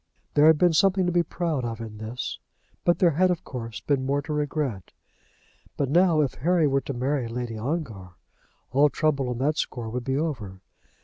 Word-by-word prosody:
There 150 +1 +6
had 160 -1 +6
been 175 +1 +4
something 190 +2 +3
to 175 - +1
be 175 0 +3
proud 165 -5 -2
of 115 -1 -4
in 110 -2 -8
this, 115 +3 -5 0.5
but 175 - +4
there 175 -2 +4
had, 185 +5 +3
of 180 -2 -1
course, 115 -4 -7
been 140 -3 0
more 140 +2 0
to 155 - -4
regret. 145 - -2 0.8
But 140 -2 -1
now 170 -1 +4
if 140 -4 0
Harry 170 +1 +3
were 135 -1 +2
to 140 - -5
marry 130 0 -1
Lady 120 0 -4
Ongar, 110 - -4 0.6
all 140 +4 +5
trouble 140 -2 0
on 125 - -3
that 145 +5 0
score 115 -3 -3
would 125 +1 -3
be 135 +2 -1
over. 115 - -3
140 Hz, 195 wpm, -25 LUFS, 120-160 Hz, 0.8 s, There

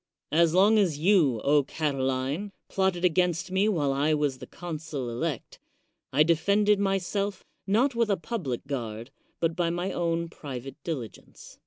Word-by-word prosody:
As 165 +2 +3
long 210 +4 +5
as 175 -8 +2
you, 160 - +3 0.3
Catiline, 140 +4 -1 0.2
plotted 190 -2 +1
against 180 +1 +1
me 195 +3 +2
while 145 -9 +1
I 150 +3 +2
was 145 -3 -1
the 130 - -9
consul 155 -7 -5
elect, 140 +3 -4 0.5
I 145 +3 +5
defended 200 +6 +3
my 195 -1 +2
self, 195 +1 -3 0.2
not 240 +8 +3
with 230 -2 +1
a 200 - +2
public 165 - -4
guard, 120 -3 -5 0.3
but 165 -1 0
by 175 -1 +1
my 175 +3 -2
own 170 -1 -1
pri 145 -5 -7
vate 135 +2 -9
diligence. 130 -10 -7
165 Hz, 155 wpm, -27 LUFS, 140-190 Hz, 0.5 s, long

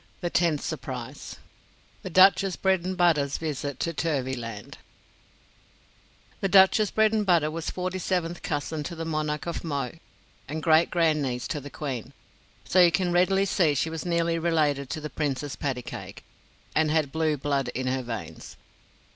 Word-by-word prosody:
The 175 -1 -2
Tenth 165 -4 +2
Surprise 130 -4 -6 0.7
THE - - -6
DUCHESS 190 +1 +5
BREDENBUTTA'S 175 -6 +1
VISIT 145 -3 -4
TO 165 - -1
TURVYLAND 130 -9 -3 1.6
The 195 - 0
Duchess 195 +2 +6
Bredenbutta 205 -8 +2
was 165 0 -4
forty 185 0 -3
seventh 175 -2 -2
cousin 150 +1 -3
to 170 - -5
the 165 0 -5
Monarch 155 -1 -2
of 170 - -4
Mo 140 -6 -2 0.6
and 155 +1 -5
great 160 0 +4
grandniece 150 -8 0
to 150 - -3
the 145 - -9
Queen; 135 -6 -5 0.5
so 185 - +4
you 175 -1 +6
can 175 +2 0
readily 190 +3 +3
see 170 -6 +2
she 160 +4 0
was 160 -1 -4
nearly 170 -1 0
related 150 -5 +1
to 155 - -4
the 150 - -5
Princess 145 -2 -2
Pattycake 130 -4 -5 0.5
and 155 -1 +2
had 155 -3 +1
blue 160 -1 0
blood 140 -1 -1
in 130 - -2
her 130 +1 0
veins. 110 -10 -7
160 Hz, 145 wpm, -26 LUFS, 140-175 Hz, 1.6 s, Duchess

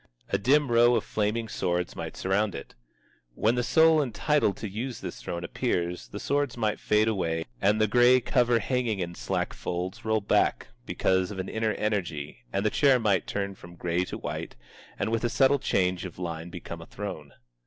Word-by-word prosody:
A 100 - +1
dim 140 +4 +3
row 120 +1 +5
of - - +1
flaming 110 +2 -1
swords 90 -4 -2
might - - -6
surround 100 +2 0
it. 70 - -8 0.6
When 110 - +2
the 125 - +1
soul 160 +5 +5
entitled 140 -4 +1
to 110 - -5
use 115 +6 -5
this - - -7
throne 85 0 -4
appears, 85 +1 -2
the 105 - -7
swords 140 -1 -1
might 110 -2 0
fade 105 +1 +2
away 85 -6 -1 0.2
and 105 +2 +3
the 110 - +4
gray 120 +3 +5
cover 120 0 +2
hanging 120 -1 0
in 85 -2 -3
slack - - -2
folds 90 +5 -4
roll 110 0 +1
back 100 - +1 0.2
because 95 -1 +1
of 105 - -7
an 95 0 -4
inner 110 -1 0
energy 85 -9 -2
and 100 +2 -1
the 105 - +3
chair 140 -3 +4
might 100 -6 +1
turn 100 -1 -2
from 85 -2 -13
gray 85 +1 0
to - - -6
white, - - -5 0.4
and - - -1
with 115 0 0
a 120 - +2
subtle 135 +3 +3
change 90 -6 0
of 90 -3 -8
line 85 -1 -5
become 85 -1 -8
a 85 - -11
throne. 95 -9 -7
105 Hz, 195 wpm, -27 LUFS, 90-120 Hz, 0.6 s, row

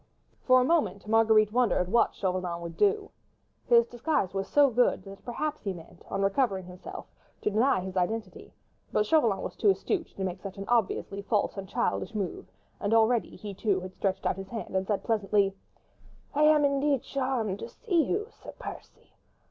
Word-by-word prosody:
For 255 0 +5
a - - +3
moment 285 -10 +1
Marguerite 220 -1 +4
wondered 235 -7 +2
what 235 +5 +2
Chauvelin 180 -2 -2
would 170 -1 -7
do. 415 0 +1 0.6
His 235 -1 +6
disguise 240 - -1
was 195 0 -2
so 285 -2 +4
good 240 -5 +2
that 195 0 -11
perhaps 300 +5 -3
he 195 -2 -3
meant, 165 -2 -13
on 195 - -1
recovering 195 -2 +1
himself, 180 +1 -9 0.4
to 210 - 0
deny 220 -1 +3
his 190 0 -6
identity: 185 +1 -2 0.4
but 210 - +2
Chauvelin 230 -7 +2
was - - -5
too 415 - +3
astute 385 -2 0
to 195 - -4
make 185 -1 -3
such 195 0 -7
an 195 - -5
obviously 210 -3 0
false 205 +1 0
and 195 -2 -7
childish 235 -2 -1
move, 195 -4 -3 0.3
and 205 +2 +1
already 225 +1 +2
he 205 -1 -7
too 195 -1 0
had 185 0 -8
stretched 190 0 -2
out - - +1
his 195 0 -7
hand 225 -4 -6
and 190 0 0
said 205 - -1
pleasantly,— 205 -3 +1 0.8
"I 300 +1 +4
am 305 -1 +5
indeed 280 -1 +1
charmed 255 -7 -2
to - - -6
see 360 -9 +1
you, 415 +6 -1
Sir - - -12
Percy. - - -10
215 Hz, 185 wpm, -28 LUFS, 195-255 Hz, 0.8 s, His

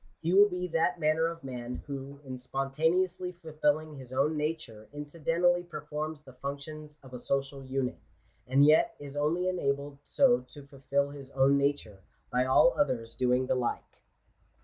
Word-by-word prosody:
He 170 +2 -1
will 205 +2 +7
be 180 -1 -3
that 165 -1 +1
manner 155 +1 +2
of 165 0 -6
jtnan, 125 -2 -5
who, 140 0 -7
in 130 -1 -6
spontaneously 160 +8 0
fulfilling 155 -2 -1
his 130 -2 -11
own 140 +4 +1
nature, 150 -8 -4
inci 145 +2 -8
dentally 175 +2 +2
performs 150 -1 -5
the 130 - -14
functions 150 +3 -7
of 130 -1 -14
a 125 - -5
social 135 +1 -2
unit; 130 -1 -2 0.5
and 135 +3 +5
yet 155 +1 +5
is 145 -1 -9
only 155 +5 +1
i 185 - +2
enabled 140 -4 -2
so 245 - +4
to 145 -2 -11
fulfil 140 0 -1
his 140 -2 -10
own 135 +1 +4
nature, 140 -8 0 0.3
by 125 +1 +2
all 130 - +5
others 115 -12 0
doing 125 +1 +2
the - - +1
like. 125 -2 -3
145 Hz, 170 wpm, -30 LUFS, 135-160 Hz, 0.5 s, will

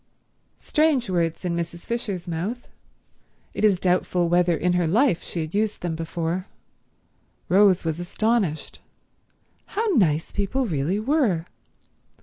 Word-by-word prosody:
Strange 295 -9 +1
words 170 0 -1
in 170 -1 -1
Mrs. 170 0 -4
Fisher's 205 -7 -3
mouth. 185 +9 -4 0.9
It - - -4
is 200 -4 +4
doubtful 180 -1 +1
whether 175 -1 +3
in 180 +2 +1
her 175 -2 +1
life 220 - +3
she 170 - -4
had 155 0 -6
used 210 +1 0
them 170 -2 -2
before. 165 +3 -3 1.0
Rose 190 -2 +4
was 160 0 -2
astonished. 190 -2 -1 1.0
How 445 - +2
nice 160 - +2
people 205 +7 -1
really 170 - -1
were. 220 - +1
180 Hz, 130 wpm, -24 LUFS, 170-215 Hz, 1.0 s, is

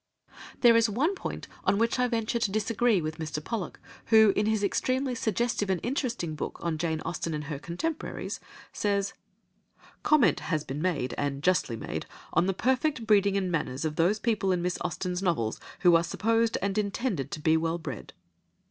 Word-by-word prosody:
There 235 -2 +7
is 230 -1 +4
one 275 - +1
point 385 - -6 0.2
on 200 - +2
which 230 +3 +1
I 250 - +3
venture 230 -1 -1
to 230 -4 0
disagree 220 -1 +2
with 155 +1 -4
Mr. 155 -1 -3
Pollock, 220 -2 -4 0.3
who, 220 -3 +6
in 210 - +1
his 220 -1 +1
extremely 255 +5 0
suggestive 225 -2 0
and 185 -2 +1
interesting 240 - -2
book 150 - -5
on 165 -2 -2
Jane 160 -1 -1
Austen 165 -2 -3
and 150 - -4
her 145 -1 -5
Contemporaries, 295 - -4 0.3
says— 200 -1 0 0.9
"Comment 300 -6 +4
has 155 -3 -1
been 140 +1 -5
made, 155 -9 0
and 140 0 -2
justly 180 -10 +2
made, 110 - -5 0.3
on 180 - +3
the 195 - +1
perfect 260 +2 +1
breeding 200 -2 +4
and 185 -2 -1
manners 150 -3 -2
of 155 -1 -2
those 175 +7 +3
people 210 -4 0
in 180 -1 0
Miss 180 0 -1
Austen's 180 +1 -2
novels 160 - 0 0.2
who 175 -2 +6
are 165 - +4
supposed 225 +6 +1
and 200 +1 0
intended 200 - -2
to - - -5
be 160 +1 +3
well 165 +1 0
bred." 145 -8 -7
195 Hz, 185 wpm, -28 LUFS, 165-230 Hz, 0.9 s, There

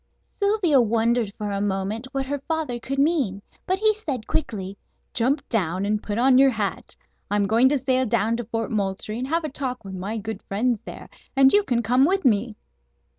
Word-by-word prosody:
Sylvia 400 - +3
wondered 230 -1 +1
for 210 -1 -3
a 200 0 -2
moment 205 +4 -2
what 270 0 -2
her 285 +1 -3
father 315 -7 -2
could 275 +3 -4
mean, 275 - +1 0.2
but 375 - +2
he 430 +2 +3
said 285 - -5
quickly: 195 -10 -3 0.4
"Jump 265 +4 0
down 190 -4 -1
and 210 +1 0
put 205 0 -4
on 255 +1 +5
your 275 0 +7
hat. 215 -5 -3 0.3
I'm 205 0 +1
going 230 +6 +4
to 290 - +2
sail 260 -1 +1
down 225 0 +1
to 240 - -4
Fort 225 0 -3
Moultrie 205 +1 -2
and 255 - -3
have 330 +3 0
a 310 - -3
talk 255 -5 -4
with 195 - -7
my 195 +4 -4
good 220 +1 -5
friends 230 +3 0
there, - - -9 0.3
and 270 0 +6
you 410 - +6
can 245 -11 -1
come 250 +5 +3
with 380 +2 +1
me." 220 -1 +2
240 Hz, 200 wpm, -24 LUFS, 210-275 Hz, 0.4 s, your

